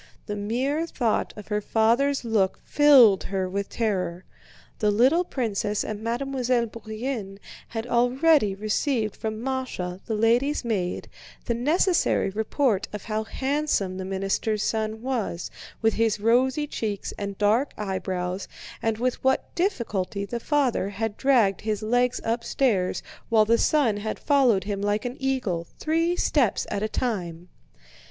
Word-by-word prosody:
The 210 Hz, -, -4 dB
mere 260 Hz, +10 st, -1 dB
thought 240 Hz, -8 st, 0 dB
of 210 Hz, -, -10 dB
her 210 Hz, 0 st, 0 dB
father's 240 Hz, +6 st, +2 dB
look 205 Hz, -4 st, +1 dB
filled 265 Hz, -10 st, +6 dB
her 190 Hz, -1 st, -1 dB
with 200 Hz, +2 st, -3 dB
terror. 185 Hz, -6 st, -2 dB, 0.5 s
The 210 Hz, -, +2 dB
little 260 Hz, -, +4 dB
princess 210 Hz, -, -1 dB
and 215 Hz, -1 st, -5 dB
Mademoiselle 250 Hz, +1 st, 0 dB
Bourienne 220 Hz, -2 st, -5 dB, 0.3 s
had 225 Hz, -1 st, -4 dB
already 245 Hz, -1 st, +3 dB
received 215 Hz, +2 st, -1 dB
from 220 Hz, 0 st, -4 dB
Másha, 250 Hz, -9 st, -3 dB
the 220 Hz, -, -1 dB
lady's 240 Hz, +6 st, +2 dB
maid, 190 Hz, -6 st, -2 dB, 0.4 s
the 235 Hz, -, 0 dB
necessary 305 Hz, -, +2 dB
report 220 Hz, 0 st, 0 dB
of 210 Hz, -2 st, -6 dB
how 220 Hz, 0 st, -2 dB
handsome 265 Hz, -8 st, -1 dB
the 190 Hz, -, -4 dB
minister's 195 Hz, +3 st, -1 dB
son 220 Hz, 0 st, -2 dB
was, 230 Hz, -9 st, -3 dB, 0.3 s
with 225 Hz, -, +4 dB
his 225 Hz, -2 st, +1 dB
rosy 255 Hz, +6 st, +2 dB
cheeks 215 Hz, -8 st, -4 dB
and 200 Hz, -1 st, -4 dB
dark 220 Hz, +7 st, +2 dB
eyebrows, 185 Hz, -2 st, -3 dB, 0.3 s
and 225 Hz, -1 st, 0 dB
with 250 Hz, +2 st, -1 dB
what 265 Hz, 0 st, +1 dB
difficulty 215 Hz, -, -1 dB
the 235 Hz, +3 st, -4 dB
father 265 Hz, -7 st, +1 dB
had 205 Hz, +1 st, -3 dB
dragged 235 Hz, -8 st, +3 dB
his 215 Hz, -1 st, -2 dB
legs 245 Hz, +3 st, +1 dB
upstairs 230 Hz, -4 st, 0 dB, 0.3 s
while 220 Hz, -2 st, +5 dB
the 230 Hz, +2 st, +3 dB
son 265 Hz, -9 st, +2 dB
had 215 Hz, +1 st, -4 dB
followed 255 Hz, -, +3 dB
him 200 Hz, 0 st, -3 dB
like 205 Hz, +2 st, 0 dB
an 245 Hz, +1 st, -3 dB
eagle, 245 Hz, -11 st, -1 dB
three 330 Hz, +2 st, +1 dB
steps 270 Hz, -, +1 dB
at 200 Hz, -, -1 dB
a 215 Hz, -, -1 dB
time. 180 Hz, -8 st, -3 dB
225 Hz, 145 wpm, -25 LUFS, 205-255 Hz, 0.5 s, filled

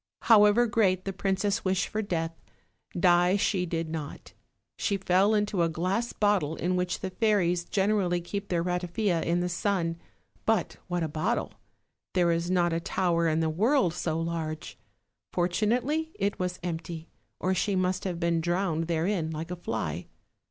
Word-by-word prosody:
However 215 Hz, +1 st, +6 dB
great 200 Hz, -6 st, +2 dB
the 195 Hz, -, -3 dB
princess' 195 Hz, +1 st, 0 dB
wish 190 Hz, 0 st, +1 dB
for 215 Hz, -, -2 dB
death, 165 Hz, -5 st, -2 dB, 0.7 s
die 175 Hz, 0 st, +4 dB
she 190 Hz, -3 st, 0 dB
did 165 Hz, -1 st, -2 dB
not; 155 Hz, -2 st, -7 dB, 0.4 s
she 200 Hz, -, 0 dB
fell 195 Hz, +3 st, +3 dB
into 205 Hz, -3 st, +1 dB
a 165 Hz, -, +3 dB
glass 185 Hz, +9 st, -1 dB
bottle 200 Hz, -7 st, +1 dB
in 180 Hz, +2 st, -1 dB
which 180 Hz, 0 st, -1 dB
the 190 Hz, -, -3 dB
fairies 180 Hz, -4 st, +1 dB
gen 200 Hz, +2 st, +1 dB
erally 175 Hz, -4 st, +1 dB
keep 200 Hz, +3 st, -5 dB
their 170 Hz, -2 st, +1 dB
ratafia 180 Hz, +1 st, 0 dB
in 170 Hz, +1 st, +1 dB
the 180 Hz, -, 0 dB
sun; 175 Hz, -2 st, -1 dB, 0.5 s
but 225 Hz, -1 st, +1 dB
what 175 Hz, -2 st, -1 dB
a -, -, 0 dB
bottle! 155 Hz, +10 st, -1 dB, 0.6 s
there 175 Hz, -2 st, +4 dB
is 170 Hz, +1 st, 0 dB
not 175 Hz, -2 st, +2 dB
a 165 Hz, -, +1 dB
tower 170 Hz, -1 st, +1 dB
in 160 Hz, 0 st, +1 dB
the 160 Hz, -, +1 dB
world 210 Hz, -, +2 dB
so 165 Hz, -2 st, -2 dB
large. 165 Hz, -2 st, -4 dB, 0.6 s
Fortunately 240 Hz, -, 0 dB
it 200 Hz, +1 st, -1 dB
was 180 Hz, 0 st, -2 dB
empty, 165 Hz, -1 st, -5 dB, 0.3 s
or 185 Hz, -, +1 dB
she 190 Hz, +2 st, 0 dB
must 185 Hz, 0 st, 0 dB
have 180 Hz, -3 st, -3 dB
been 170 Hz, -1 st, +1 dB
drowned 170 Hz, -1 st, 0 dB
therein 170 Hz, 0 st, 0 dB
like 160 Hz, +2 st, -5 dB
a -, -, -2 dB
fly. 90 Hz, -, -4 dB
180 Hz, 165 wpm, -28 LUFS, 170-200 Hz, 0.7 s, However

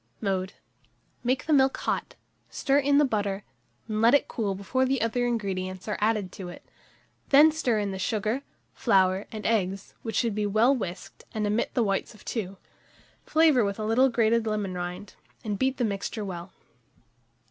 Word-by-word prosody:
Mode. 190 Hz, -1 st, -1 dB, 0.7 s
Make 255 Hz, +2 st, 0 dB
the 315 Hz, -, +1 dB
milk 270 Hz, -1 st, +4 dB
hot; -, -, -2 dB, 0.3 s
stir 280 Hz, 0 st, +1 dB
in 285 Hz, 0 st, +3 dB
the 295 Hz, -, +5 dB
butter, 205 Hz, -5 st, -1 dB, 0.4 s
and 215 Hz, -1 st, -2 dB
let 235 Hz, +4 st, +6 dB
it 285 Hz, -, +2 dB
cool 205 Hz, -4 st, -2 dB
before 200 Hz, +7 st, 0 dB
the 265 Hz, 0 st, +1 dB
other 245 Hz, +2 st, 0 dB
ingredients 190 Hz, -5 st, -3 dB
are 210 Hz, -, -2 dB
added 210 Hz, -3 st, +1 dB
to 185 Hz, -2 st, -8 dB
it; 175 Hz, -, -11 dB, 0.6 s
then 295 Hz, +3 st, +7 dB
stir 255 Hz, -8 st, 0 dB
in 205 Hz, -1 st, -1 dB
the 190 Hz, -, -5 dB
sugar, 215 Hz, +5 st, -1 dB, 0.3 s
flour, 190 Hz, -3 st, +2 dB
and 215 Hz, -1 st, -7 dB
eggs, 195 Hz, -3 st, -1 dB
which 225 Hz, -3 st, -5 dB
should 230 Hz, -3 st, +1 dB
be 210 Hz, 0 st, -1 dB
well 225 Hz, +7 st, +4 dB
whisked, 185 Hz, -7 st, -7 dB
and 215 Hz, -1 st, 0 dB
omit 210 Hz, +3 st, -1 dB
the 240 Hz, -, +3 dB
whites 200 Hz, +2 st, -1 dB
of -, -, -18 dB
2; 195 Hz, -4 st, -4 dB, 0.7 s
flavour 315 Hz, -6 st, +4 dB
with 200 Hz, -1 st, -2 dB
a 215 Hz, -, -3 dB
little 250 Hz, +5 st, +4 dB
grated 230 Hz, -1 st, +2 dB
lemon 210 Hz, -3 st, -1 dB
rind, 180 Hz, +2 st, -6 dB, 0.3 s
and 210 Hz, -3 st, -3 dB
beat 265 Hz, 0 st, +1 dB
the 245 Hz, -, +1 dB
mixture 205 Hz, +1 st, -3 dB
well. 180 Hz, -1 st, -6 dB
215 Hz, 180 wpm, -27 LUFS, 195-245 Hz, 0.7 s, then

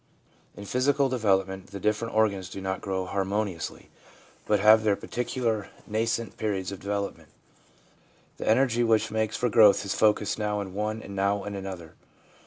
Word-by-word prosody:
In 100 Hz, -, -8 dB
physical 135 Hz, +4 st, +2 dB
development 95 Hz, -6 st, 0 dB
the 100 Hz, 0 st, -8 dB
different 105 Hz, +2 st, -1 dB
organs 100 Hz, -4 st, +1 dB
do 95 Hz, -, -7 dB
not 95 Hz, 0 st, -3 dB
grow 95 Hz, -1 st, -2 dB
harmoniously, 95 Hz, -1 st, -3 dB, 0.6 s
but 105 Hz, -1 st, +3 dB
have 110 Hz, +2 st, +7 dB
their 105 Hz, -2 st, +3 dB
particular 115 Hz, -2 st, -2 dB, 0.2 s
nascent 115 Hz, 0 st, -2 dB
periods 100 Hz, -3 st, -2 dB
of 100 Hz, -, -7 dB
development. 100 Hz, 0 st, -4 dB, 1.1 s
The -, -, -6 dB
energy 120 Hz, 0 st, +3 dB
which 110 Hz, -1 st, +2 dB
makes 110 Hz, 0 st, -1 dB
for 125 Hz, -, +1 dB
growth 105 Hz, -3 st, +5 dB
is 100 Hz, -, -1 dB
focused 105 Hz, 0 st, +2 dB
now 105 Hz, -1 st, -1 dB
in 95 Hz, -2 st, -6 dB
one 105 Hz, +2 st, -3 dB
and 100 Hz, -, -8 dB
now 100 Hz, +1 st, 0 dB
in 100 Hz, -, -5 dB
another. 95 Hz, -4 st, -7 dB
105 Hz, 160 wpm, -27 LUFS, 95-110 Hz, 1.1 s, have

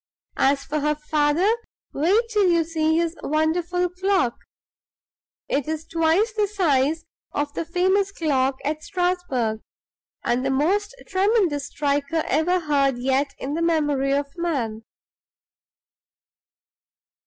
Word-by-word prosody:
As 275 Hz, +1 st, +3 dB
for 305 Hz, -, -2 dB
her 300 Hz, +1 st, +1 dB
father, 300 Hz, +3 st, +1 dB, 0.5 s
wait 365 Hz, +11 st, +3 dB
till 415 Hz, -4 st, +3 dB
you 335 Hz, -1 st, +3 dB
see 320 Hz, -1 st, 0 dB
his 335 Hz, 0 st, 0 dB
wonderful 340 Hz, +4 st, 0 dB
clock! 365 Hz, -7 st, 0 dB, 1.1 s
It's 310 Hz, +3 st, -2 dB
twice 330 Hz, +7 st, +1 dB
the 420 Hz, -1 st, +1 dB
size 325 Hz, -6 st, +1 dB, 0.3 s
of 290 Hz, 0 st, -2 dB
the -, -, -2 dB
famous 375 Hz, +3 st, +1 dB
clock 275 Hz, -7 st, 0 dB
at 305 Hz, +2 st, -2 dB
Strasbourg, 355 Hz, -, -1 dB, 0.6 s
and 245 Hz, +2 st, 0 dB
the 270 Hz, -, 0 dB
most 390 Hz, -, +1 dB
tremendous 375 Hz, -7 st, +1 dB
striker 290 Hz, +2 st, -1 dB
ever 350 Hz, +5 st, +1 dB
heard 280 Hz, -4 st, +1 dB
yet 265 Hz, +3 st, 0 dB
in 275 Hz, +2 st, -4 dB
the 330 Hz, -, -2 dB
memory 295 Hz, -5 st, +1 dB
of 285 Hz, +1 st, +1 dB
man!" 270 Hz, -11 st, -2 dB
315 Hz, 120 wpm, -23 LUFS, 280-360 Hz, 1.1 s, As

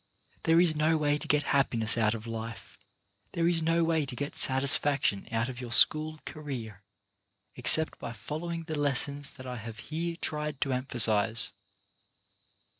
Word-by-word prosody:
There 165 Hz, +1 st, +4 dB
is 170 Hz, -3 st, +2 dB
no 155 Hz, +1 st, +2 dB
way 145 Hz, -1 st, 0 dB
to -, -, -4 dB
get 150 Hz, 0 st, +2 dB
happiness 115 Hz, -5 st, +3 dB
out 115 Hz, -1 st, +1 dB
of 110 Hz, 0 st, -9 dB
life, 115 Hz, 0 st, -8 dB, 0.6 s
there 170 Hz, 0 st, 0 dB
is 170 Hz, -1 st, +1 dB
no 165 Hz, +1 st, +1 dB
way 160 Hz, -1 st, +1 dB
to 125 Hz, -, -6 dB
get 145 Hz, +3 st, -5 dB
satisfaction 135 Hz, -5 st, +2 dB
out 115 Hz, 0 st, -1 dB
of 130 Hz, -1 st, -7 dB
your 120 Hz, -2 st, -7 dB
school 155 Hz, +4 st, +3 dB
career, 120 Hz, -10 st, -7 dB, 0.7 s
except 155 Hz, +5 st, +4 dB
by -, -, -6 dB
following 155 Hz, -, -6 dB
the 160 Hz, -1 st, -6 dB
lessons 145 Hz, 0 st, -1 dB
that 130 Hz, -2 st, -12 dB
I 125 Hz, -1 st, -6 dB
have 110 Hz, 0 st, -9 dB, 0.2 s
here 170 Hz, +1 st, -2 dB
tried 150 Hz, -4 st, -4 dB
to 135 Hz, -, 0 dB
emphasize. 115 Hz, -3 st, +3 dB
140 Hz, 160 wpm, -28 LUFS, 115-155 Hz, 0.7 s, There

